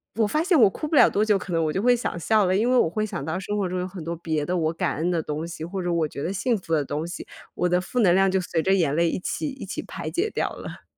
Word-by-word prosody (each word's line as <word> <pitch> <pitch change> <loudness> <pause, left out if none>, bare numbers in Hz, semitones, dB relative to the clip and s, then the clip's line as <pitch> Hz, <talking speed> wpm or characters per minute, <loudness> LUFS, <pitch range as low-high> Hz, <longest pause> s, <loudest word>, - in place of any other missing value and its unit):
我 220 -1 +2
发 305 +9 0
现 350 -5 +3
我 205 - +7
哭 305 - -5
不 305 - -1
了 - - +7
多 210 +2 +1
久， 210 -2 +3
可 185 - -8
能 165 -1 +1
我 155 - -1
就 190 - -1
会 245 +1 +4
想 230 -7 -3
笑 215 +2 +3
了。 185 +1 +2
因 230 +5 +2
为 255 - +4
我 200 - +4
会 215 +6 -2
想 195 -9 -4
到 160 +4 -2
生 205 +2 -3
活 195 -2 0
中 180 0 -3
有 180 - -2
很 180 -3 -8
多 170 +2 -3
别 155 -3 -2
的 180 - -1
我 160 -2 +1
感 170 -3 -2
恩 170 +3 0
的 165 -3 0
东 155 +2 -4
西， 165 -2 -6
或 190 +2 -4
者 175 -1 -1
我 165 -2 +1
觉 140 - -7
得 180 - -2
幸 225 +5 0
福 180 -5 -8
的 150 -3 +2
东 150 +4 -3
西， 175 - -7 0.3
我 180 - +1
的 180 +1 +2
负 245 +6 -3
能 180 -5 +5
量 195 +1 +4
就 190 - +1
随 175 -3 -1
着 190 +3 +3
眼 160 -6 +1
泪 170 0 +3
一 - - -2
起 300 - -3
一 265 -6 -8
起 195 - -5
排 - - -6
解 385 +6 0
掉 - - -1
了。 - - -9
180 Hz, 355 characters per minute, -24 LUFS, 165-210 Hz, 0.3 s, 我